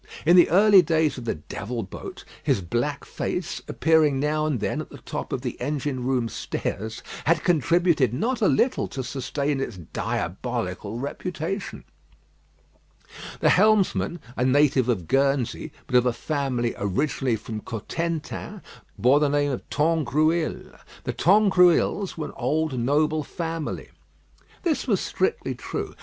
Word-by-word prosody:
In 170 +3 +6
the 175 - +7
early 200 +2 +7
days 160 -4 +1
of 120 - -9
the - - -1
"Devil 110 +9 -5
Boat," 95 - -9 0.2
his - - +1
black 120 - -2
face, 180 -2 -3
appearing 155 -4 +3
now 155 +2 0
and 140 -6 -1
then - - -1
at - - -9
the - - -11
top - - -6
of 130 - -2
the 125 -2 -5
engine 140 -1 -2
room 125 -2 0
stairs, 110 0 -4 0.2
had 165 0 +2
contributed 170 - +3
not 230 - -1
a 205 - +4
little 235 - +2
to 130 - -5
sustain 140 +2 -2
its 120 -7 -4
diabolical 90 +4 -3
reputation. 170 +7 -4 1.6
The - - +5
helmsman, 195 -3 +3 0.2
a 125 - 0
native 130 -1 +3
of 95 -9 -1
Guernsey, 135 +1 +1
but 130 - -3
of 125 0 +5
a 125 - +1
family 130 -3 -1
originally 125 +5 0
from 110 0 -6
Cotentin, 165 - -4 0.3
bore 130 +4 +4
the 150 -1 +2
name 145 0 +1
of 130 - -6
Tangrouille. 155 +1 0 0.2
The - - -3
Tangrouilles 190 -1 +3
were 155 - -3
an - - -8
old 145 +1 0
noble 150 +5 +1
family. 165 0 -4 0.7
This 325 -6 0
was 200 -6 +2
strictly 185 -7 -1
true. - - -5
145 Hz, 145 wpm, -25 LUFS, 125-165 Hz, 1.6 s, the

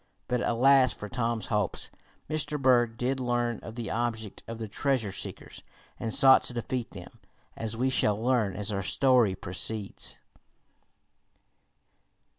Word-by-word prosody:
But 125 -1 0
alas 130 +2 +4
for 105 - -8
Tom's 120 -1 -2
hopes. 105 -2 -1 0.4
Mr. 150 -1 -1
Berg 120 -4 +3
did 130 +3 -1
learn 120 -2 -1
of 115 - -9
the 120 -2 -4
object 110 -3 -3
of 115 - -6
the 110 -1 -5
treasure 120 -1 -1
seekers, - - -7 0.4
and 115 - -3
sought 135 +4 +7
to - - -3
defeat 120 0 -3
them, 90 -3 -12 0.4
as 115 0 -3
we 130 +2 +1
shall 105 -4 +2
learn 115 -5 +1
as 105 0 -2
our 100 -1 -1
story 120 -1 +3
proceeds. 95 +4 -4
120 Hz, 140 wpm, -28 LUFS, 110-130 Hz, 0.4 s, sought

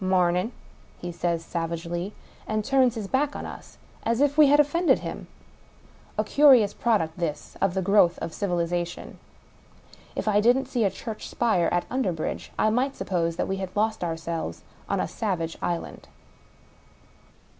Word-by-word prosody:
" - - -4
Mam 180 -2 +3
in! 185 +7 -1 0.3
" - - -29
he 175 - -3
says 170 -1 -2
savagely 170 +2 -3 0.2
— - - -22
^and 215 0 0
turns 260 -1 +3
his 215 -3 -4
back 280 +6 0
on - - -5
us, - - -10 0.2
as 230 +1 0
if 285 0 +3
we 305 -1 +7
had 290 +2 +5
offended 320 +4 +4
him. - - -7 0.9
A - - +2
curious 265 -8 +6
product, 180 -8 0
this, 160 -4 -4
of 195 -2 +1
the 190 - 0
growth 180 -3 +4
of 165 - -5
civilization. 175 -3 -2 1.0
If - - -3
I 210 -1 +4
didn't 245 +4 +4
see 250 -4 0
a - - +3
church 220 +2 -7
spire 220 -8 +2
at 175 - +1
Under 255 -7 +1
bridge, 165 -2 -4
I 215 - +3
might 265 +4 0
suppose 170 -3 -1
that - - -1
we 195 - -2
had 190 0 -5
lost 220 -1 0
ourselves 165 -1 -4 0.3
on - - 0
a - - 0
savage 175 -7 -2
island. 170 -1 -4
195 Hz, 175 wpm, -26 LUFS, 175-240 Hz, 1.0 s, we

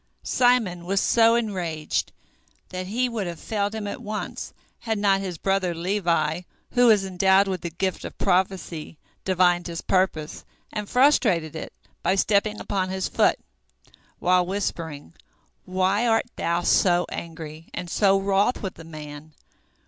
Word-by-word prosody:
Simon 235 -9 +2
was 195 +2 +1
so 230 +2 +4
enraged 180 -9 -2 0.6
that 185 0 -5
he 245 +6 0
would 225 -6 -3
have 170 -2 -6
felled 205 -1 -2
him 215 -1 -4
at 205 - -5
once, 215 -2 -5 0.3
had 225 -2 -2
not 195 -1 +2
his 185 -3 -4
brother 190 -1 0
Levi, 170 -3 0 0.3
who 245 0 +4
was 210 -4 +5
endowed 190 +1 +3
with 185 -2 -2
the 170 - -4
gift 185 +3 -2
of - - -8
prophecy, 180 -4 -1 0.3
divined 180 -2 +3
his 170 -1 -5
purpose, 185 -5 0 0.3
and 210 -1 -4
frustrated 210 - +3
it 160 - -6 0.3
by 190 - +2
stepping 210 +2 +1
upon 185 -2 -2
his 190 0 -2
foot, - - +2 0.8
while 180 0 +3
whispering: 165 - -4 0.5
"Why 190 +5 +1
art 225 -1 +3
thou 170 +1 0
so 175 -1 +3
angry, 160 -1 -7
and 180 0 -5
so 195 +2 +3
wroth 200 +5 +1
with 190 - -3
the 165 - -12
man? 155 -1 -10
185 Hz, 150 wpm, -24 LUFS, 170-205 Hz, 0.8 s, was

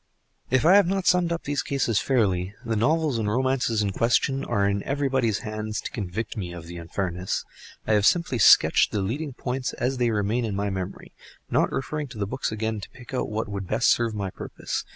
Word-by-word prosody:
If 130 +3 +2
I 175 - +7
have 200 -4 +5
not 190 0 -1
summed 180 -2 +3
up 170 - -2
these 145 0 -1
cases 120 -6 0
fairly, 100 -7 +1
the 115 - -1
novels 150 +3 +1
and 105 -2 0
romances 125 -2 +1
in 100 - 0
question 130 +6 +1
are 100 -1 +1
in 100 0 0
everybody's 135 -5 0
hands 110 0 -3
to - - -6
convict 105 +1 -4
me 90 -5 -5
of 85 -2 -8
the 85 +1 -8
unfairness. 90 +2 -3 0.4
I 110 - +2
have 105 -1 +4
simply 165 -8 +2
sketched - - +6
the 105 -2 -1
leading 140 +8 -3
points 130 +1 -3
as 130 +2 -1
they 120 -1 +2
remain 110 +2 0
in 105 -3 -2
my 100 0 -1
memory, 95 0 -6 0.4
not - - +2
referring 150 +2 -3
to 115 - -11
the 100 - -1
books 130 +5 -3
again 110 0 -2
to - - -9
pick 125 0 -13
out 130 - -1
what 110 +1 -2
would 100 -2 -5
best 110 +6 +3
serve 115 -2 +1
my 100 -2 -3
purpose. - - -5
110 Hz, 215 wpm, -25 LUFS, 100-135 Hz, 0.4 s, I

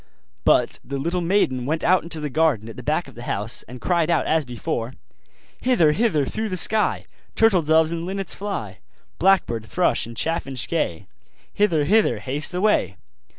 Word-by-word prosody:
But - - +3
the 140 - -5
little 170 +6 -1
maiden 165 -9 +1
went 160 +2 -1
out 185 0 +4
into 165 -1 -5
the 150 -2 -4
garden 150 -8 +1
at 115 - -9
the - - -8
back 155 +7 -1
of - - -13
the 120 - -11
house, 110 -1 -2
and 125 0 -9
cried 170 0 +1
out 170 -2 +2
as 160 -2 +1
before: 120 0 -4 0.6
'Hither, 225 -12 +3
hither, 155 -6 +1
through 220 +9 -3
the 185 - -2
sky, 215 +4 +1 0.3
Turtle 225 -6 +4
doves 160 +1 +3
and 170 0 -3
linnets, 195 +1 -3
fly! 110 - -5 0.4
Blackbird, 170 - +2
thrush, 110 +1 0
and 115 -1 -10
chaffinch 135 -6 -3
gay, 120 - -2 0.5
Hither, 175 -8 +2
hither, 205 - +3
haste 130 +8 -3
away! 180 - +1
160 Hz, 175 wpm, -23 LUFS, 125-185 Hz, 0.6 s, out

